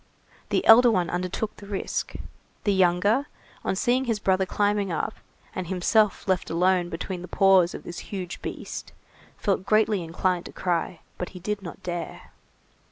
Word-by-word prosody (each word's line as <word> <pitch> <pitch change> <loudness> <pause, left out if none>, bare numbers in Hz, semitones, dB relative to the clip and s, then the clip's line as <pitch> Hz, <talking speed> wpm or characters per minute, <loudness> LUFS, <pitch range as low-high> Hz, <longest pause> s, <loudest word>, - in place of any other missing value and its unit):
The - - +1
elder 240 +2 +8
one 180 -6 +1
undertook 185 +4 -3
the 200 - -11
risk. 200 -1 -3 0.5
The 205 - +2
younger, 190 +8 +3 0.4
on - - 0
seeing 250 +6 +1
his 230 -3 0
brother 190 -2 +1
climbing 205 -1 +1
up, 165 - -2 0.4
and 185 -2 -4
himself 195 +4 +2
left 185 -2 0
alone 180 +1 +2
between 180 +2 -5
the 180 - -7
paws 190 -3 +4
of - - -8
this 175 - -7
huge 185 -3 -5
beast, - - -6 0.4
felt 195 -2 0
greatly 215 -2 +2
inclined 175 +2 -1
to - - -12
cry, 175 -1 -2 0.2
but 180 - -3
he - - -8
did 210 +3 -3
not 175 -3 -9
dare. 175 -2 -5
190 Hz, 165 wpm, -26 LUFS, 175-205 Hz, 0.5 s, elder